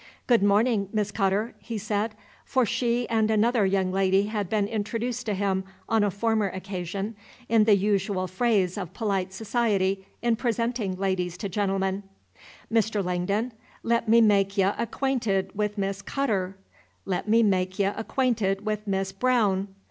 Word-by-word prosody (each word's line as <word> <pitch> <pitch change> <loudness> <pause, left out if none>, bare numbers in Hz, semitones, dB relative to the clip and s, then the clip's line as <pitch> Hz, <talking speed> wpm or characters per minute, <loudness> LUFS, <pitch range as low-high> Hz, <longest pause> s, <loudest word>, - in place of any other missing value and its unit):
"Good 240 -4 +4
morning, 205 0 +3
Miss 210 -2 -1
Cutter," 200 +2 0
he 230 -2 -5
said; 210 +1 -2 0.3
for 260 -2 +1
she 240 +2 0
and 220 -1 +1
another 220 -1 +3
young 190 -1 +1
lady 190 +1 +3
had 205 -3 -3
been 210 -1 +1
introduced 230 +3 -3
to 210 - 0
him, 190 -1 0 0.2
on 225 -2 +2
a 205 - +2
former 215 +1 0
occasion, 190 +2 -5 0.3
in 225 -2 +4
the 210 -2 +6
usual 200 -1 0
phrase 190 -1 +1
of 185 -1 -7
polite 195 -4 -1
society 195 -2 0 0.2
in 235 -1 +2
presenting 230 -4 -1
ladies 185 -2 -1
to 200 - -4
gentlemen, 195 0 0 0.7
"Mr. 220 -3 +1
Langdon, 195 +7 -1 0.3
let 235 -1 +1
me 230 +1 +7
make 200 -2 +3
y' 195 - +4
acquainted 230 -6 -1
with 210 0 -1
Miss 195 0 -2
Cutterr; 195 -8 -1 0.5
let 190 +2 -2
me 230 +1 +5
make 185 -2 +1
y' 200 - +2
acquainted 220 -5 0
with 215 0 -2
Miss 195 -1 -1
Braowne." 200 -3 +1
205 Hz, 155 wpm, -26 LUFS, 195-225 Hz, 0.7 s, me